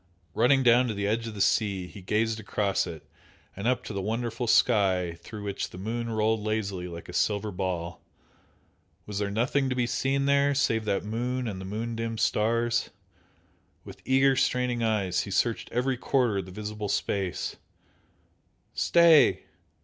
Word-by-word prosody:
Running 135 +5 +3
down 125 +1 +5
to 110 - -3
the 100 0 -2
edge 115 +3 -1
of 110 - -7
the 100 - -3
sea 100 -3 +1
he 90 +3 -11
gazed 110 +4 0
across 100 -3 -1
it 80 -4 -8 0.5
and 100 +4 -3
up 125 0 +1
to - - -7
the 100 - -2
wonderful 115 +3 -2
sky 95 -7 +3
through 105 +4 -9
which 100 -1 -3
the - - -11
moon 115 +4 -3
rolled 110 0 +1
lazily 105 -4 -2
like 85 -1 -9
a - - -9
silver 105 0 0
ball. 90 -3 -4 1.0
Was 105 -1 -4
there 100 -1 -1
nothing 125 +6 0
to 130 - -1
be 125 -1 +1
seen 135 +3 0
there 140 0 +3
save 115 -5 +1
that 100 -2 0
moon 120 +4 -2
and 95 -3 -5
the - - -7
moon 115 +4 -4
dimmed 115 -1 -3
stars? 115 +1 +1 1.0
With - - -11
eager 135 +1 +3
straining 125 -2 0
eyes 100 -5 0
he - - -6
searched 115 +4 0
every 125 +2 0
quarter 120 -6 +1
of 95 - -5
the 95 - -11
visible 105 +1 -5
space 95 -2 -2 1.2
stay! 165 -5 +5
110 Hz, 170 wpm, -27 LUFS, 100-120 Hz, 1.2 s, down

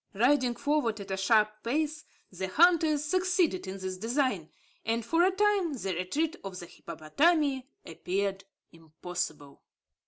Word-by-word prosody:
Riding 250 +2 +3
forward 265 -8 0
at 200 -1 -8
a - - 0
sharp 215 +2 +2
pace, 305 +6 -2 0.3
the 190 +1 -4
hunters 315 - +4
succeeded 360 - +1
in 190 +1 -5
this 185 -1 -5
design; 225 - -1 0.3
and, 230 0 -1
for 330 +7 +2
a 370 - +5
time, 390 -4 +1
the 195 -8 -3
retreat 295 - -1
of 195 -2 -6
the 175 - -8
hippopotami 270 - 0 0.2
appeared 195 +4 -2 0.3
impossible. 160 -2 -6
230 Hz, 135 wpm, -29 LUFS, 190-305 Hz, 0.3 s, a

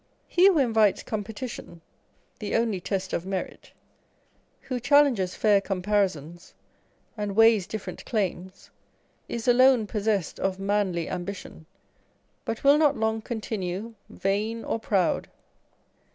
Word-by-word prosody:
He 365 +3 +5
wrho 320 -8 +3
invites 220 -4 +2
competition 215 -4 -6 0.6
(the 210 - -3
only 230 -4 +1
test 190 0 -3
of 170 - -1
merit), 190 0 -5 0.9
who 255 -2 -4
challenges 250 -8 +3
fair 205 -2 +3
comparisons, 185 -5 -2 0.6
and 205 -3 -4
weighs 225 -4 +5
different 195 -4 -6
claims, 190 -4 -4 0.6
is 235 0 -4
alone 250 -1 +5
pos 210 0 -4
sessed 200 -7 0
of 190 -1 -1
manly 195 -4 0
ambition; 180 -3 -7 0.8
but 225 - -4
will 285 +2 +6
not 300 -2 +3
long 220 0 0
continue 215 -2 -4 0.2
vain 215 +4 -2
or - - -2
proud. 195 -5 0
210 Hz, 120 wpm, -26 LUFS, 190-230 Hz, 0.9 s, will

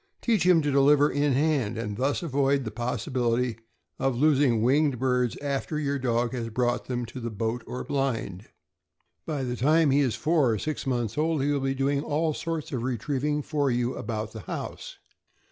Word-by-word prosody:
Teach 215 -7 +1
him 170 -4 +5
to 145 - 0
deliver 145 +1 +5
in 145 0 +1
hand, 135 -6 +1
and 105 -2 -3
thus 135 - 0
avoid 140 -2 +1
the 110 - -4
possibility 120 0 -1 0.4
of 135 -2 +1
losing 135 -5 +3
winged 140 +2 +3
birds 125 -1 0
after 140 +2 -2
your 140 -2 -1
dog 120 -2 0
has 115 -2 -3
brought 120 +2 0
them 125 -1 -3
to 120 +3 -8
the 120 -1 -4
boat 115 +2 -3
or 125 - -5
blind. 115 -8 -2 0.8
By 145 -4 -2
the 125 -1 -2
time 150 +4 +3
he 140 - +4
is 130 -6 +1
four 150 +2 +2
or - - -1
six 150 +5 -4
months 120 -2 -1
old, 155 -2 +1
he 145 - +1
will 145 - +1
be 135 0 -1
doing 140 +1 +1
all 155 +2 0
sorts 165 -1 -4
of 125 - -2
retrieving 140 +4 -1
for 145 -1 0
you 120 0 0
about 110 -1 -4
the 110 - -8
house. - - -6
135 Hz, 190 wpm, -27 LUFS, 120-145 Hz, 0.8 s, him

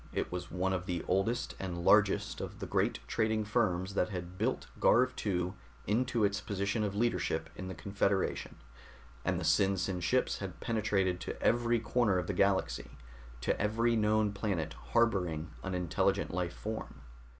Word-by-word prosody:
It - - -2
was 90 -1 -4
one 95 +1 0
of 90 -1 -3
the 85 -2 -2
oldest 95 +6 0
and 85 -2 -4
largest 100 -2 +4
of - - -6
the - - -5
great - - +1
trading 110 - +1
firms 100 -4 0
that 90 - +1
had 90 -2 -6
built - - -1
Garv 125 +2 +4
II 90 -3 0 0.3
into 115 +2 +1
its 100 0 +1
position 100 +2 -1
of 100 -1 -2
leadership 120 +3 0
in 95 - -6
the 95 - -5
Confederation, 100 +3 -1 0.7
and - - 0
the - - -4
SinSin 95 -2 +2
ships 85 - +1
had - - -6
penetrated 100 -5 0
to - - -5
every 120 0 +2
corner 110 -3 +2
of 90 - -1
the 100 - -2
galaxy, 100 +1 0 0.4
to - - 0
every 115 +3 +2
known 105 -1 +2
planet 100 -6 -2 0.2
harboring 90 - +1
an 95 -1 -3
intelligent 90 -2 0
life 90 -1 -2
form. 110 -9 -6
100 Hz, 160 wpm, -32 LUFS, 90-110 Hz, 0.7 s, largest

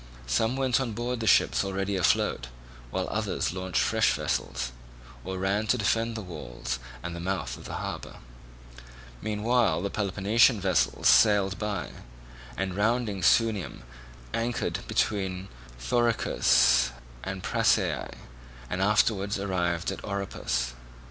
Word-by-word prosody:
Some 110 - +1
went 135 -1 +1
on 120 -4 -3
board 120 +2 -3
the 110 - -2
ships - - +4
already 95 +1 -2
afloat, 75 -8 +1 0.4
while - - -2
others - - -1
launched 95 -1 0
fresh - - +2
vessels, 60 - -2 0.5
or 95 +1 -4
ran 100 +3 0
to 125 - +3
defend 115 +1 0
the 110 - -5
walls 75 -8 -5 0.2
and 85 0 -5
the - - -6
mouth 95 +2 -2
of - - -12
the - - -5
harbour. - - -5 1.1
Meanwhile 110 -2 +1
the 100 - -2
Peloponnesian 105 +3 +3
vessels 95 -2 +1
sailed 100 -3 +5
by, 100 -7 -3 0.7
and 95 +2 -2
rounding 110 -1 0
Sunium 105 -3 +2 0.5
anchored 115 +1 -1
between 95 -2 -1 0.3
Thoricus - - +3 0.3
and 95 -1 -5
Prasiae, - - +1 0.6
and 90 - -1
afterwards 100 0 +2
arrived 90 -4 -1
at - - -7
Oropus. 65 -11 -2
100 Hz, 125 wpm, -27 LUFS, 90-110 Hz, 1.1 s, sailed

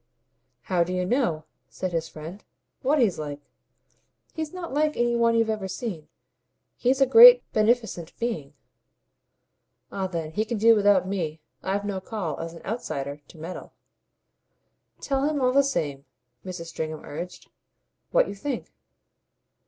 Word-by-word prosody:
"How 180 -2 +1
do 175 - -5
you 180 0 0
know," 180 - 0 0.2
said 185 -1 -4
his 165 -1 -2
friend, 165 +6 -9 0.4
"what 280 +4 +2
he's 225 - +2
like? 145 -1 -5 0.9
He's 315 -2 -4
not 360 -5 -6
like 305 +1 +1
any 240 0 +2
one 230 0 +3
you've 225 -1 +3
ever 210 -3 -3
seen. 185 -5 -5 0.7
He's 260 +2 +1
a - - +8
great 485 - +9
beneficent 215 -6 0
being." 195 -13 -3 1.4
"Ah 190 -1 -2
then 165 -4 -4
he 210 +7 0
can 225 +1 -3
do 230 +2 +6
without 205 -3 +4
me. 165 -5 -3 0.2
I've 200 +2 -2
no 195 -2 -3
call, 185 -7 -4
as 165 0 -6
an 165 - -13
outsider, 145 - -4
to - - -16
meddle." 165 +4 -8 1.3
"Tell 270 -1 -1
him, 300 -1 0
all 255 -1 +2
the 280 - +6
same," 145 - -2 0.4
Mrs. 180 -3 -6
Stringham 155 -1 -5
urged, 175 +5 -8 0.6
"what - - +3
you - - -5
think." 245 +6 -5
200 Hz, 150 wpm, -26 LUFS, 165-245 Hz, 1.4 s, great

